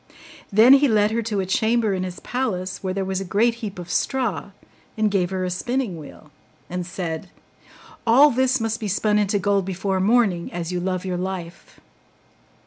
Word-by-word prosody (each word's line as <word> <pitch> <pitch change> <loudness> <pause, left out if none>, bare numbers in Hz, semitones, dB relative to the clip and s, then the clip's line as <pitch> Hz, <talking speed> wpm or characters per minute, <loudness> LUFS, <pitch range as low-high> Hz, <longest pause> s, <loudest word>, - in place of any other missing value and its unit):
Then 220 +6 +7
he 280 +1 +6
led 215 -3 +3
her 230 +1 0
to 210 -3 -2
a - - -3
chamber 220 +2 +1
in 185 - -2
his 185 -1 -5
palace 190 -8 -3
where 190 - -2
there 190 0 -2
was 190 0 -2
a - - -2
great 210 +6 +2
heap 205 -4 -5
of 175 -1 -7
straw, 250 -6 -1 0.5
and 215 -1 +2
gave 185 -3 +1
her 185 -1 -2
a 180 - -2
spinning 240 +2 -2
wheel, 150 0 -13 0.4
and 180 -1 -3
said, 175 -1 -5 0.8
'All 275 +6 +7
this 260 +1 +2
must 225 0 -2
be 215 - -3
spun 210 +2 +1
into 205 0 +1
gold 200 0 +1
before 190 +1 -2
morning, 195 -4 +2
as 170 0 -4
you 180 - -1
love 185 0 -2
your 180 -1 -2
life. 180 -2 -6
195 Hz, 190 wpm, -23 LUFS, 185-225 Hz, 0.8 s, Then